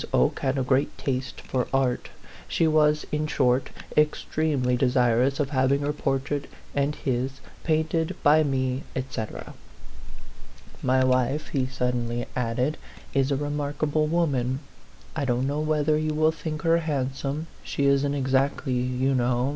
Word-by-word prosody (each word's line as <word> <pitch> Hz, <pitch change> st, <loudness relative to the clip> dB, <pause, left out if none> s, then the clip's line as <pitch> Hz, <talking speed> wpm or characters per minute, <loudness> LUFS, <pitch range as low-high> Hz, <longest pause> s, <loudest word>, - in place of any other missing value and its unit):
Oke 65 Hz, -, +2 dB
had 135 Hz, +1 st, 0 dB
a 135 Hz, -, +1 dB
great 130 Hz, +2 st, +1 dB
taste 130 Hz, -1 st, -3 dB
for 125 Hz, -1 st, -2 dB
art; 130 Hz, -2 st, 0 dB, 0.4 s
she 165 Hz, -, +2 dB
was, 150 Hz, -1 st, +3 dB
in 150 Hz, 0 st, 0 dB
short, 130 Hz, -2 st, +2 dB, 0.3 s
extremely 150 Hz, -3 st, +1 dB
de 125 Hz, +1 st, +2 dB
sirous 125 Hz, +1 st, +2 dB
of 145 Hz, -1 st, 0 dB
having 135 Hz, +1 st, +2 dB
her 145 Hz, +1 st, 0 dB
portrait 140 Hz, 0 st, -2 dB, 0.2 s
and 145 Hz, +1 st, 0 dB
his 130 Hz, -2 st, -1 dB, 0.3 s
painted 160 Hz, 0 st, 0 dB
by 150 Hz, +2 st, +6 dB
me, 130 Hz, -2 st, 0 dB
et 130 Hz, 0 st, -4 dB
cetera. 110 Hz, -1 st, -5 dB, 0.7 s
" 65 Hz, -1 st, -19 dB
My 130 Hz, 0 st, +4 dB
wife," 130 Hz, +3 st, +1 dB
he 130 Hz, -3 st, 0 dB
suddenly 125 Hz, -2 st, -1 dB
added, 125 Hz, +4 st, 0 dB, 0.2 s
" -, -, -20 dB
is 135 Hz, 0 st, +2 dB
a -, -, +3 dB
re 145 Hz, +2 st, -2 dB
markable 150 Hz, +1 st, 0 dB
woman. 135 Hz, -6 st, 0 dB, 0.5 s
I -, -, -1 dB
don't 125 Hz, -1 st, +1 dB
know 145 Hz, +2 st, -1 dB
whether 155 Hz, 0 st, +2 dB
you 155 Hz, 0 st, -1 dB
will 155 Hz, +1 st, +4 dB
think 155 Hz, -1 st, -5 dB
her 165 Hz, 0 st, +4 dB
handsome 140 Hz, -1 st, -2 dB, 0.2 s
she 140 Hz, -, -1 dB
isn't 140 Hz, +1 st, +3 dB
ex 135 Hz, -1 st, -1 dB
actly, 135 Hz, 0 st, +1 dB
you 125 Hz, +2 st, 0 dB
kno\v. 125 Hz, 0 st, +1 dB
135 Hz, 160 wpm, -26 LUFS, 130-150 Hz, 0.7 s, by